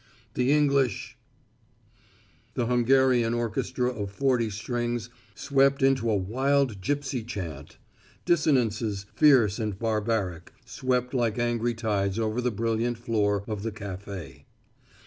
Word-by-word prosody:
The 125 +3 +1
English 140 -6 +1 0.6
" - - -34
The 120 - 0
Hungarian 125 -1 +3
orchestra 125 +2 -1
of 105 -5 -5
forty 120 +1 +1
strings 120 +2 -3 0.2
swept 135 +2 +2
into 130 -4 +3
a 110 - +2
wild 125 +3 0
gipsy 140 +2 -2
chant. 85 - -7 0.5
Dissonances, 115 - +1
fierce 125 -9 +4
and 105 -4 -2
barbaric, 105 -6 -2
swept 125 0 -1
like 120 -4 0
angry 120 0 0
tides 105 -3 -1
over 110 +1 -1
the 125 - +1
brilliant 115 +2 -1
floor, 105 -4 0
of 105 -2 -4
the 115 +1 -3
café. 100 - -8
115 Hz, 120 wpm, -27 LUFS, 105-125 Hz, 0.6 s, fierce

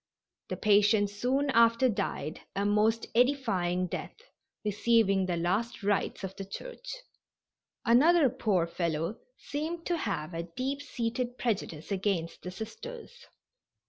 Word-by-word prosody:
The - - -3
patient 205 0 +4
soon 260 +7 0
after 230 +1 +5
died 195 - -2
a 200 - 0
most 215 +2 +2
edifying 195 -9 +2
death, 180 - -5 0.5
receiving 205 -2 +3
the 175 -2 0
last 200 +7 -1
rites 200 0 0
of 190 0 -5
the 195 - -4
Church. - - -8 0.9
Another 290 +7 +6
poor 215 -9 +1
fellow 170 +2 -2 0.2
seemed 325 +3 -4
to 345 - 0
have 175 - -3
a 165 - -2 0.2
deep 275 +2 -1
seated 245 -2 -3
prejudice 190 -8 -2
against 190 -4 -1
the 180 - -6
Sisters. 460 - -9
215 Hz, 125 wpm, -30 LUFS, 190-255 Hz, 0.9 s, Another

